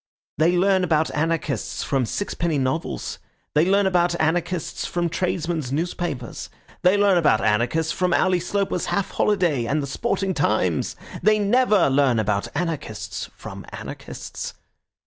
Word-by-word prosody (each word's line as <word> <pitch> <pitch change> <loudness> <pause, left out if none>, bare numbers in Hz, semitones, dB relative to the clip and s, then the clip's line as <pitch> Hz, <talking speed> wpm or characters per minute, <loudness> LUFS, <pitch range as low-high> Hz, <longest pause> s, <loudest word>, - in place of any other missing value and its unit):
They 170 +3 +4
learn 190 0 +3
about 160 -3 +2
anarchists 155 -6 -1
from 135 -4 0
sixpenny 170 - -1
novels; 135 +5 -2 0.3
they 155 +3 +3
learn 200 +1 +4
about 175 -2 +2
anarchists 170 +2 -1
from 175 -1 -1
tradesmen's 165 -5 -2
newspapers; 155 -4 -3 0.3
they 185 +3 +4
learn 200 -3 +4
about 150 -9 +4
anarchists 120 +10 +1
from 180 -1 0
Ally 185 0 +3
Sloper's 190 +1 -1
Half 200 - -1
Holiday 175 - +1
and 140 +6 0
the 140 - -2
Sporting 195 - -1
Times. 105 - 0 0.3
They 215 +4 +4
never 210 -1 +3
learn 135 -3 +3
about 105 -2 0
anarchists 150 - -3
from - - -8
anarchists. - - -7
165 Hz, 135 wpm, -23 LUFS, 140-185 Hz, 0.3 s, They